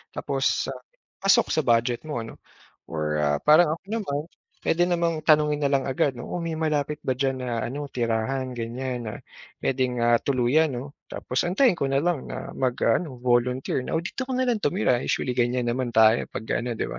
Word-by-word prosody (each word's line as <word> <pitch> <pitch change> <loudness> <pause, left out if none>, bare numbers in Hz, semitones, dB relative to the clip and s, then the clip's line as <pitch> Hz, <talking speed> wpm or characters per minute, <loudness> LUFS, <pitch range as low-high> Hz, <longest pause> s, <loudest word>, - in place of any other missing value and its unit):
tapos - - 0
ah, - - -8 0.4
pasok 195 0 +4
sa - - +2
budget 120 0 +1
mo, 145 -7 -3
ano? 115 - -11 0.5
Or 75 -1 -1
ah, 75 0 +2
parang 155 - +4
ako - - -71
naman, 200 -10 -2 0.5
pwede 175 - +3
namang 170 -2 0
tanungin 150 -1 +3
na 140 - +2
lang 135 -2 +1
agad, 135 +1 +1
'no? - - -7
Oh, 175 - -3
may 165 -1 -3
malapit 150 -2 -1
ba 130 - +2
diyan 135 +1 0
na 115 -2 -2
ano 145 +4 -4
tirahan 125 +2 -1
ganyan 120 +1 -4
na 110 - -4 0.5
pwede 130 -1 +1
nga 120 0 +3
tuluyan 140 +4 +2
no, 130 +4 -6 0.2
tapos 125 +5 -2
antayin 190 +2 +3
ko 140 - 0
na 135 +1 +1
lang 170 -5 0
na - - -6
mag-aano 125 +1 0
volunteer 125 +2 +1
na, - - -3
O, 165 - +1
dito 255 +9 -4
ka 260 - -3
na 255 - +1
lang 235 - +1
tumira. 125 - +1
Usually 125 - -1
ganyan 120 0 0
naman 120 -1 -2
tayo 110 +1 +5
pag - - -6 0.2
ano, 120 0 -3
'di - - -2
ba? - - -6
130 Hz, 200 wpm, -25 LUFS, 120-155 Hz, 0.5 s, tayo